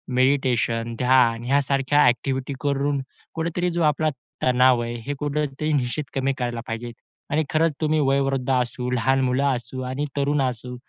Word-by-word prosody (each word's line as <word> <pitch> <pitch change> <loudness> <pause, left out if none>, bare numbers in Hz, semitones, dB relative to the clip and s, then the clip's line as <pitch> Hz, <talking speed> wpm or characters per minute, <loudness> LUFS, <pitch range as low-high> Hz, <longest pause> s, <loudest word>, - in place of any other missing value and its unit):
Meditation, 125 -3 +1
ध्यान 125 -2 +3
यासारख्या 140 +1 +2
activity 130 +3 0
करून 140 -1 0 0.3
कुठेतरी 170 +2 -1
जो 170 - +1
आपला 155 +1 +2 0.3
तणाव 125 -1 +4
आहे, 120 0 -3
हे 145 - -2
कुठेतरी 150 0 -2
निश्चित 130 +1 -1
कमी 135 0 0
करायला 120 -2 -2
पाहिजे. 115 +1 -5 0.4
आणि 155 +1 +2
खरंच 160 +1 +2
तुम्ही 155 0 +2
वयोवृद्ध 135 -1 +1
असू, 125 0 -1
लहान 130 +2 +2
मुलं 130 +2 +1
असू 125 +2 -6
आणि 140 +3 -2
तरुण 140 +1 +1
असू, 125 -1 -3
135 Hz, 150 wpm, -23 LUFS, 125-145 Hz, 0.4 s, तणाव